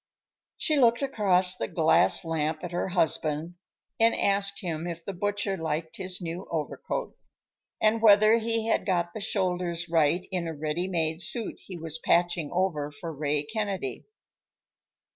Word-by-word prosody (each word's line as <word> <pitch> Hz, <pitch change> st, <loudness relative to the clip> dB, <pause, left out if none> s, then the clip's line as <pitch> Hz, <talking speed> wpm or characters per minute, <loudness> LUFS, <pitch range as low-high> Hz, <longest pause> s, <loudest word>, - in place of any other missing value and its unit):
She 310 Hz, -2 st, +2 dB
looked 235 Hz, +1 st, +4 dB
across 190 Hz, -8 st, +3 dB
the -, -, -3 dB
glass 160 Hz, 0 st, +3 dB
lamp 155 Hz, 0 st, -2 dB
at 175 Hz, -, -5 dB
her 175 Hz, -, -2 dB
husband 160 Hz, -2 st, 0 dB, 0.5 s
and 230 Hz, +1 st, +4 dB
asked 200 Hz, 0 st, +2 dB
him 165 Hz, -2 st, -4 dB
if 170 Hz, -1 st, -6 dB
the 200 Hz, -, -4 dB
butcher 205 Hz, +1 st, -2 dB
liked 160 Hz, -1 st, -4 dB
his 185 Hz, -1 st, -3 dB
new 175 Hz, +2 st, -6 dB
overcoat, 165 Hz, -, -4 dB, 0.6 s
and 220 Hz, +1 st, +2 dB
whether 215 Hz, +1 st, +6 dB
he 225 Hz, 0 st, -1 dB
had 225 Hz, -, +1 dB
got 175 Hz, -3 st, -1 dB
the 220 Hz, -, -6 dB
shoulders 180 Hz, -4 st, -1 dB
right 165 Hz, +2 st, +2 dB
in 180 Hz, -3 st, -2 dB
a 165 Hz, -, -5 dB
ready 155 Hz, +4 st, -2 dB
made 165 Hz, -2 st, -1 dB
suit 225 Hz, +6 st, -1 dB
he 185 Hz, -, -7 dB
was 160 Hz, -1 st, -4 dB
patching 170 Hz, -3 st, +1 dB
over 170 Hz, -5 st, -1 dB
for 160 Hz, +3 st, -7 dB
Ray 145 Hz, 0 st, 0 dB
Kennedy. 195 Hz, -, -4 dB
175 Hz, 155 wpm, -27 LUFS, 160-200 Hz, 0.6 s, whether